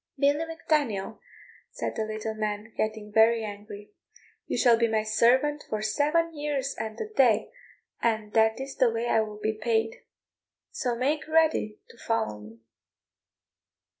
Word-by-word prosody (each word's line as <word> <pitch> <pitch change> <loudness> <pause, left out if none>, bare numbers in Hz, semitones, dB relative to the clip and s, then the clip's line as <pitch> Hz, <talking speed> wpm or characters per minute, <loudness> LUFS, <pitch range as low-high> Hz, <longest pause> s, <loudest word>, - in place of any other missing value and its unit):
"Billy 285 +3 +2
Mac 325 0 -10
Daniel," 225 -9 0 0.5
said - - -4
the 220 - -1
little 215 0 -4
man, 215 0 -4
getting 215 -1 -3
very 225 +1 +4
angry, 205 0 -8 0.6
"you - - -2
shall 240 -3 +5
be 230 0 +2
my 220 -1 0
servant 255 +7 +2
for 215 -1 -2
seven 310 +8 +1
years 290 -2 -2
and 220 -1 -5
a 435 - -3
day, 265 - +2 0.5
and 215 -2 0
that 220 +1 +3
is 270 +1 -6
the 255 -3 +4
way 230 +1 -2
I 225 - +3
will 210 -1 -5
be 215 +1 -1
paid; 225 0 -1 0.7
so 245 -4 -2
make 285 +6 -1
ready 315 -9 +2
to 235 - -20
follow 225 - -1
me." 110 +2 -14
225 Hz, 155 wpm, -27 LUFS, 215-275 Hz, 0.7 s, shall